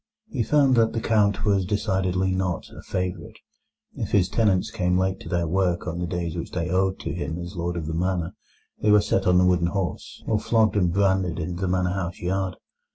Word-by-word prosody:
He 125 - -1
found 135 +3 +3
that 115 -1 +3
the 115 - -1
Count 105 -3 +2
was 100 -2 +3
decidedly 95 -2 0
not 95 -2 -2
a - - -9
favourite. 90 -1 -4 0.6
If - - -4
his 95 -2 +3
tenants 105 -1 +1
came 90 -5 +1
late 95 +1 0
to - - -9
their 85 -2 0
work 90 0 0
on 90 -1 -4
the 90 - -2
days 85 -1 -3
which 85 - -4
they 85 -1 -2
owed 95 +1 +1
to - - -4
him 80 +3 -4
as 85 +2 -7
Lord 85 0 -2
of 80 - -3
the 80 - -4
Manor, 90 0 -1 0.5
they 105 - +2
were 105 0 +7
set 95 -1 0
on 90 0 +5
the 90 - +5
wooden 90 -1 +3
horse, 95 -2 -4
or 110 -2 +1
flogged 110 -1 +2
and 90 -4 +2
branded 95 -2 +1
in 85 +2 -3
the 95 +1 -1
manor 90 0 +1
house 95 -2 -3
yard. 95 +1 -2
95 Hz, 220 wpm, -24 LUFS, 90-100 Hz, 0.6 s, were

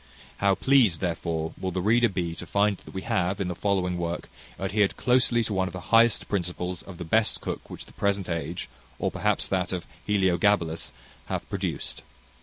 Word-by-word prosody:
How 100 -1 +3
pleased, 125 -11 +4
therefore, 80 -2 -2
will 95 - -1
the 95 0 -2
reader 115 +5 +4
be 85 -3 -2
to - - -8
find 100 0 +2
that - - -14
we 95 - -3
have, 90 +3 0
in 95 -2 -1
the 90 - -3
following 90 -2 0
work, 85 0 -3 0.3
adhered 100 +1 +1
closely 125 -1 +3
to 110 - -2
one 95 -1 +1
of 90 - -7
the 90 - -5
highest 115 0 +5
principles 90 -2 -2
of 95 -3 -11
the 90 - -5
best 110 +6 +2
cook - - -5
which - - -8
the - - -17
present 100 -2 0
age, 85 0 -3 0.3
or - - -1
perhaps - - +1
that 95 -1 0
of 90 -2 -3 0.2
Heliogabalus, 95 -4 +2 0.4
hath - - -3
produced. - - -3
95 Hz, 190 wpm, -27 LUFS, 85-105 Hz, 0.4 s, highest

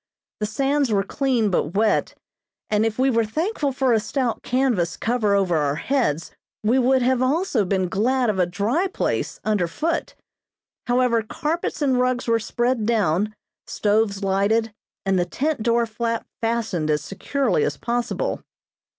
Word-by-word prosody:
The 210 - -1
sands 275 +3 +1
were 200 -2 +2
clean 240 -2 0
but 175 -1 -1
wet, 215 +2 +1 0.6
and 215 +1 +3
if 220 - -4
we 265 +1 +3
were 230 -1 +2
thankful 305 - -1
for 260 -2 +1
a 225 - +4
stout 245 +1 -2
canvas 245 -10 0
cover 225 -4 +1
over 185 -4 +2
our 145 -2 +1
heads 170 - -1 0.3
we 235 +5 +3
would 260 0 +3
have 255 0 +2
also 265 - +1
been 185 0 0
glad 245 +7 +1
of 205 -3 0
a 180 - +3
dry 225 - 0
place 380 - -2
under 210 -5 +1
foot. 325 - -2 0.7
However, 245 -1 +2
carpets 305 +7 -3
and 260 -3 +2
rugs 250 -1 0
were 230 0 +3
spread 240 0 -1
down, 210 -2 +1 0.3
stoves 205 -1 +1
lighted, 205 +3 +1 0.3
and 195 -1 +2
the 175 - +1
tent 285 - -2
door 235 +1 +2
flap 230 +1 -3 0.2
fastened 225 -9 -1
as 150 -1 +1
securely 200 - 0
as 145 - -1
possible. 245 - -2
230 Hz, 160 wpm, -23 LUFS, 200-260 Hz, 0.7 s, a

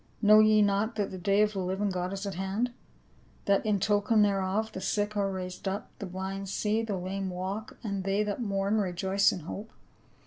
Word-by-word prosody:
Know 215 0 +7
ye 215 -1 +6
not 205 +2 +1
tliat 205 -2 -1
the 185 - -6
day 200 +3 +3
of 210 0 0
the 195 - -3
living 190 +2 -1
God 180 0 -2
is 195 +1 -4
at 200 - -3
hand? 195 +7 -1 0.7
That 200 -1 +3
in 210 -2 +1
token 210 +2 +3
thereof 200 +2 0
the 190 - -6
sick 205 +2 -1
are 200 -1 +1
raised 185 0 -5
up, 195 +2 -3
the 200 - -5
blind 190 +1 -5
see, 215 +3 0
the 215 -4 -2
lame 190 +1 -3
walk, 190 +6 -5
and 200 -3 -2
they 195 +2 +1
that 210 +3 -3
mourn 200 0 0
rejoice 190 +1 +2
in 180 - -5
hope 200 +7 -7
195 Hz, 205 wpm, -29 LUFS, 190-210 Hz, 0.7 s, Know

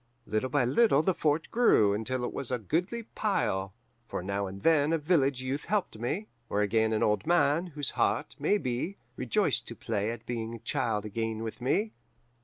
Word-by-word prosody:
Little 110 +4 -1
by 130 -1 +2
little 150 - +4
the 190 - +2
fort 155 -1 0
grew, 110 - +4
until 125 +4 -2
it - - -4
was 130 - -3
a 125 - 0
goodly 180 - -1
pile; 95 - 0 0.4
for - - -4
now 100 +1 -2
and 95 +1 -9
then 155 -1 +4
a - - +3
village 140 -5 +1
youth 135 +3 -3
helped 195 - -1
me, 155 - -2 0.2
or 105 - +1
again 110 +1 +2
an 110 - +1
old 105 +8 +1
man, 170 0 +3
whose 145 -4 -3
heart, - - 0
maybe, 165 -1 0 0.2
rejoiced 125 -4 0
to - - -7
play 105 -1 -2
at 115 0 -6
being 115 -1 -4
child 115 -7 -1
again 110 +1 -3
with 115 +2 -6
me. 205 - +1
130 Hz, 185 wpm, -29 LUFS, 110-160 Hz, 0.4 s, little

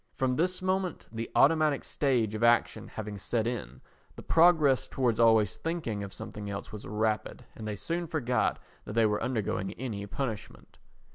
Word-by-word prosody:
From 130 -1 +1
this 180 +6 0
moment, 185 -2 -1
the 115 0 -5
automatic 155 -1 +4
stage 120 -7 +1
of 110 +1 -3
action 120 0 +3
having 105 -2 -6
set 115 +3 -1
in, 70 - -4 0.3
the - - -10
progress 160 -6 +4
towards 120 -4 0
always 110 -4 +4
thinking 160 -11 -3
of 100 - -7
something 105 +1 -6
else 100 0 -6
was 105 - -8
rapid 110 +1 -1
and 110 - -7
they 105 - -3
soon 170 - -3
forgot 130 -7 0 0.3
that - - -6
they 115 0 +4
were 105 -1 +1
undergoing 110 -5 -2
any 110 -5 -5
punishment. 110 -2 -6
115 Hz, 165 wpm, -29 LUFS, 105-145 Hz, 0.3 s, automatic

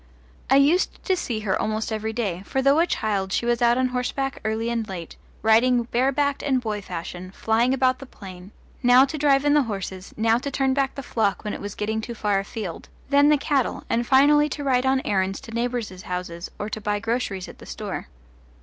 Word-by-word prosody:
I 270 - +5
used 290 +7 +3
to 380 - +2
see 235 -10 -3
her 200 -3 0
almost 215 +1 -2
every 220 0 -2
day, 205 -6 -2
for 265 - -1
though 275 +3 +4
a 340 - +3
child 200 - -1
she 235 - 0
was 240 0 +1
out 240 0 +4
on 255 0 +2
horseback 260 +2 -2
early 220 +2 -1
and 230 -2 -2
late, 175 -4 -7 0.3
riding 240 +3 +4
barebacked 275 +4 0
and 270 -3 +1
boy 215 -4 -3
fashion, 180 0 -7
flying 225 +5 +1
about 255 -1 +2
the 275 - -10
plain, 190 -4 -11 0.3
now 250 +1 +6
to 280 - -6
drive 280 -1 +3
in 290 - +4
the 295 - +5
horses, 195 -5 -5
now 225 +1 +3
to 280 - -4
turn 270 -1 +1
back 275 0 0
the 275 - -6
flock 215 -5 0
when 210 - -3
it - - -6
was 205 0 -6
getting 220 +1 -2
too 235 +1 -6
far 205 -2 +1
afield, 195 -3 -6 0.2
then 285 +1 +5
the 300 - +5
cattle, 275 -3 0
and 235 +1 +1
finally 295 +3 +5
to 290 +1 -5
ride 260 -1 +2
on 265 0 +2
errands 190 -1 0
to 255 -4 -11
neighbours' 235 -5 -3
houses 180 -1 -5
or 205 - -4
to 215 0 -5
buy 210 0 0
groceries 210 -4 -2
at - - -12
the - - -12
store. - - -5
235 Hz, 215 wpm, -24 LUFS, 205-270 Hz, 0.3 s, now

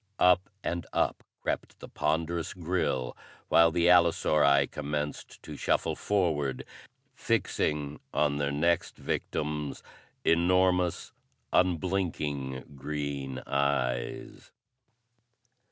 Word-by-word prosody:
Up 90 +1 +4
and 85 -1 -3
up - - 0 0.2
crept - - -3
the - - -9
ponderous 80 +3 -1
grille, 85 -8 -1 0.3
while 85 0 +6
the 85 +1 +1
allosauri 75 -5 +5
commenced 75 +1 -5
to - - -8
shuffle - - 0
forward, 80 -10 0 0.5
fixing 75 -1 -1
on 75 -1 +1
their 70 -1 0
next 85 +4 +1
victims 75 -2 -3 0.4
enormous, 90 +1 +2 0.4
unblinking 80 -7 0
green 70 -2 -4
eyes. 70 -4 -1
75 Hz, 90 wpm, -29 LUFS, 70-85 Hz, 0.5 s, while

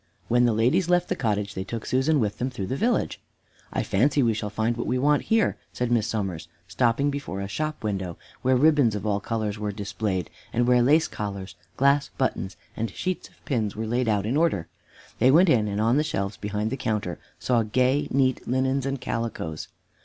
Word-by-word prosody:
When 120 +1 +4
the 120 - +3
ladies 130 - +2
left 180 0 +2
the - - +1
cottage, 105 -4 -1
they 95 - -3
took 115 +3 -5
Susan 140 +4 +2
with 105 -4 -1
them 125 - 0
through 110 -7 -5
the 130 - -2
village. 230 - 0 0.5
"I - - -1
fancy 135 +7 +2
we 115 -2 +3
shall 105 -1 -3
find 110 +3 0
what 120 - -3
we 130 - +1
want 145 +3 +2
here," 225 -1 +2 0.2
said 125 -1 -2
Miss 115 -2 +2
Somers, 95 -8 -3 0.2
stopping 120 +8 +1
before 140 -9 -4
a 100 - -3
shop 155 +8 -3
window 95 -5 -3 0.2
where 130 0 +3
ribbons 145 -6 +4
of 105 0 -4
all 105 -1 +1
colors 105 -1 -3
were 105 -1 -2
displayed, 100 -3 -3 0.2
and 120 +1 +1
where 125 -1 +5
lace 150 +6 +4
collars, 100 -2 -5 0.2
glass 140 +1 +3
buttons 95 -9 -1 0.2
and 115 0 -2
sheets 185 -1 -4
of - - -28
pins 110 -8 -1
were 110 +1 -3
laid 120 +1 0
out 105 -2 +1
in 120 +5 0
order. 155 - +1 0.5
They 125 - +5
went 170 +6 +6
in, 110 -7 +3
and 100 0 -2
on 115 +4 +3
the 150 - +3
shelves 100 -9 -2
behind 105 +1 -3
the 135 - -2
counter 105 -8 -2 0.2
saw 120 -2 +2
gay, 130 +6 +1
neat 130 -1 +1
linens 130 +2 +1
and 135 0 -2
calicoes. 115 -11 -4
115 Hz, 205 wpm, -25 LUFS, 105-135 Hz, 0.5 s, went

